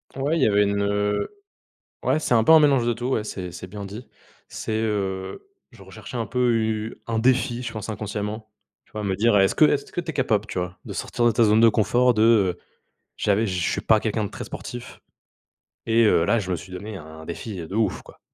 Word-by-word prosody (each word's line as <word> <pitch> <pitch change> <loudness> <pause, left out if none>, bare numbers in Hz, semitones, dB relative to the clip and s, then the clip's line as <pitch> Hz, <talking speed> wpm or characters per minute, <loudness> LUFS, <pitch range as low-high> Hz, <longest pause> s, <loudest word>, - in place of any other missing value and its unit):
Ouais 140 +5 0
il - - 0
y - - +5
avait 105 -1 +4
une, 100 0 0
heu 105 0 0 0.8
ouais, - - +2
c'est 125 - +1
un 110 -1 +4
peu 160 - +6
un 160 - +8
mélange 140 -5 +3
de 120 - +2
tout, 120 +2 -4
ouais, 125 -5 0
c'est 95 -4 -6
c'est 90 +1 -8
bien 100 +2 -8
dit. 105 +5 -8 0.4
C'est - - -5
heu 95 -3 -3 0.3
je - - -15
recherchais - - -10
un 115 - -2
peu 125 +2 +1
u 110 -1 -2
un 115 -1 0
défi, 125 0 +1
je 120 -2 -5
pense 110 -2 -6
inconsciemment, 105 0 -4 0.4
tu - - -31
vois? 105 - -4
Me 95 -2 -1
dire, 115 +2 +3
heu, 100 - +5
est-ce 95 - +3
que - - +6
est-ce 145 -2 +1
que - - -2
tu 170 - -5
es - - -6
capable, 110 -6 +1
tu 95 - -5
vois? 90 0 -4
De - - -7
sortir 120 - -2
de 120 - +5
ta 115 - +2
zone 110 0 +5
de 115 - +7
confort, 120 +3 +3
de 110 -5 +3 0.6
j'avais 105 +2 +1
je 90 -3 -2
suis - - -1
pas 110 -1 +4
quelqu'un 110 -1 -1
de 100 - -5
très - - -7
sportif, 120 -1 -8 0.9
et 115 +1 +4
heu, 95 -6 +4
là 115 - +3
je 95 -3 -4
me 90 - +1
suis 90 - -11
donné 100 +3 -7
un 80 -2 -11
défi 95 +6 -6
de 95 - -8
ouf, 110 -4 0
quoi. - - -17
110 Hz, 240 wpm, -24 LUFS, 100-120 Hz, 0.9 s, un